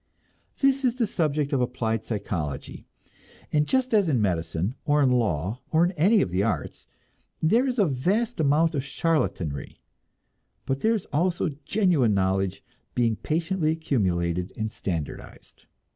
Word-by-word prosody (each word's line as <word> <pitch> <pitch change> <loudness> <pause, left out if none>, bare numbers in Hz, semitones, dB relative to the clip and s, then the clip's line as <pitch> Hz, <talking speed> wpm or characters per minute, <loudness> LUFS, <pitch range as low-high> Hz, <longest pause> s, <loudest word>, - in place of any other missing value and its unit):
This 275 0 +3
is 245 -2 +2
the 245 -3 +1
subject 150 -7 -1
of 135 - +2
applied 115 -3 -1
psychology, 85 - -4 0.7
and 150 -1 +3
just 260 -2 +1
as 205 -6 +4
in 130 -5 +2
medicine, 85 0 -1
or 145 0 +3
in 130 - +3
law, 110 - 0
or 165 +2 +4
in 175 - 0
any 195 +6 +3
of 90 - -5
the 90 +2 +1
arts, 100 -9 -3 0.5
there 230 +12 +3
is 255 -1 -2
a 205 - +4
vast 190 - 0
amount 155 +2 +3
of 140 -3 -1
charlatanry, 135 - -2 0.9
but 135 0 -1
there 225 +7 +2
is 205 - -4
also 170 +3 +1 0.2
genuine 170 - +2
knowledge 95 0 0 0.3
being 115 -2 +2
patiently 165 - -1
accumulated 90 - 0
and 110 0 -2
standardized. 85 -9 -6
140 Hz, 145 wpm, -26 LUFS, -, 0.9 s, as